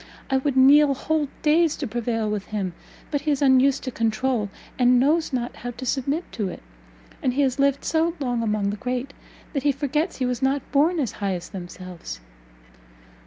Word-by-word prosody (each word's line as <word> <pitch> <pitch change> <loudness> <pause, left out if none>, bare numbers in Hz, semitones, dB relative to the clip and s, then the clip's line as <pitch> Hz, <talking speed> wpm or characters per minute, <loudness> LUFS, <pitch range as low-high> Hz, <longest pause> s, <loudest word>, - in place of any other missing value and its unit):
I 265 - +4
would 265 0 -1
kneel 280 +2 +6
whole 310 +2 0 0.2
days 315 +1 +4
to 290 - -4
prevail 225 -1 -1
with 210 -2 -2
him, 195 -4 -3 0.4
but 285 -2 0
he 305 - -2
is 285 -2 +2
unused 270 -1 +4
to 255 - -3
controul, 230 -1 0 0.3
and 250 0 +5
knows 310 +5 +2
not 245 -2 -3
how 245 - -5
to 250 +2 -7
submit 280 +6 0
to 205 -5 -2
it; - - -9 0.6
and 255 - +1
he 285 - +3
has 265 0 0
lived 280 0 +2
so 330 +1 +1
long 245 -4 -1
among 210 -3 0
the 210 - -5
great, 250 +4 -3 0.4
that 280 - 0
he 290 - +3
forgets 295 +5 -1
he 255 - 0
was 250 0 -2
not 270 +1 0
born 315 +5 +3
as 260 -6 0
high 200 -2 -2
as 175 0 -7
themselves. 180 - -8
260 Hz, 195 wpm, -24 LUFS, 230-285 Hz, 0.6 s, kneel